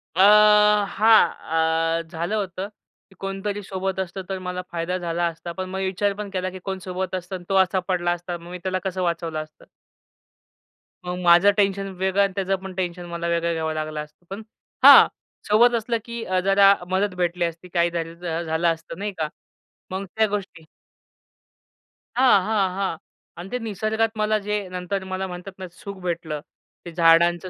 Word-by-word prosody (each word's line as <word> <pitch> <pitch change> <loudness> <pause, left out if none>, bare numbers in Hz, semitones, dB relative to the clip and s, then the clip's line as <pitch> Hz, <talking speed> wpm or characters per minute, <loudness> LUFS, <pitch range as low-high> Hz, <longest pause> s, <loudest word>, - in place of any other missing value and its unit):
अ, - - -3 0.7
हां. 165 -6 +3
अ, - - -2
झालं 170 +5 -2
होतं, 190 -1 -3 0.4
की 190 - -21
कोणतरी 195 +1 -4
सोबत 190 0 -3
असतं, 190 +1 -4
तर 190 -1 -3
मला 180 0 -4
फायदा 175 +2 -2
झाला 175 -1 -1
असता, 165 +1 -6
पण 185 +2 -5
मी 190 0 -3
विचार 200 +2 0
पण 210 0 -6
केला, 185 0 -1
की 185 - -9
कोण 190 -1 -3
सोबत 185 0 -3
असतं 185 +1 -5
अन् 180 - -8
तो 195 - +1
असा 190 -1 +3
पडला 175 -2 0
असता, 175 0 -4
मग 170 +1 -13
मी 180 - -5
त्याला 185 0 -1
कसं 185 -1 -2
वाचवलं 165 -2 -2
असतं. 155 0 -20 1.4
मग 180 0 -3
माझं 175 +3 +6
टेन्शन 195 -1 +1
वेगळं 190 +1 +1
अन् 195 - 0
त्याचं 195 0 0
पण 190 - -7
टेन्शन 180 -1 -3
मला 170 0 -4
वेगळं 170 0 0
घ्यावं 160 -1 -2
लागलं 155 0 -4
असतं. 150 +3 -20
पण 195 +3 -6 0.4
हां, - - +10 0.4
सोबत 235 +4 +5
असलं, 230 +1 -1
की 235 -1 -6
अ, 185 -3 0
जरा 195 0 +6 0.2
मदत 190 0 0
भेटली 175 -1 0
असती, 170 +2 -6
काही 170 0 +3
जर 165 -1 -3 0.3
अ, - - -2
झालं 160 +1 0
असतं, 165 0 -10
नाही 205 +1 -2
का. 155 -2 -2 0.6
मग 190 +1 -3
त्या 220 0 +4
गोष्टी 200 -5 -5 1.5
हां, 250 -5 +5
हां, 205 -2 +1
हां 195 -4 -2 0.4
अन् 185 - -9
ते 250 - -3
निसर्गात 220 0 -1
मला 215 0 +2
जे 210 - 0
नंतर 180 +2 -3
मला 190 0 -3
म्हणतात 180 +1 -8
ना 185 - -6
सुख 200 +3 -9
भेटलं. 170 -4 -3 0.5
ते 175 - -7
झाडांचं 170 +1 +4
185 Hz, 180 wpm, -23 LUFS, 170-195 Hz, 1.5 s, हां